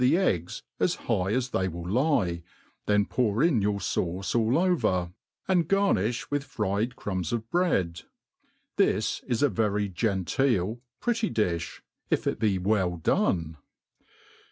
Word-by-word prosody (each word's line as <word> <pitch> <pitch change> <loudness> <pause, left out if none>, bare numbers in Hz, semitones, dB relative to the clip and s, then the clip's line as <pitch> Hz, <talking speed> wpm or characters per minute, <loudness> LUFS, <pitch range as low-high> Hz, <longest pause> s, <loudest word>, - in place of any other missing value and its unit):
the 125 +7 +4
eggs 90 - -1 0.2
as - - +2
high 95 +1 +1
as 125 +2 0
they 95 - 0
will 85 -1 -6
lie, 105 - +1 0.5
then 105 -1 +3
pour 115 +1 +1
in 155 -10 +3
youi: 105 +1 +1
fauce 90 0 -2
all 115 +3 +2
o\^er, 110 - +1 0.3
and 180 -4 +2
garnifh 125 - +1
with 145 -1 0
firied 110 -1 -2
crumbs 95 -4 -3
of 115 -1 -2
bread* 95 - +1 0.8
This - - +1
is 120 +2 0
a 145 - +5
very 105 -3 0
genteel 105 +3 0 0.2
pretty 235 -2 0
difb, 85 -6 -2 0.3
if - - 0
it - - -1
be 105 -4 +2
well 95 -2 +1
done. 80 0 0
105 Hz, 140 wpm, -27 LUFS, 90-130 Hz, 0.8 s, a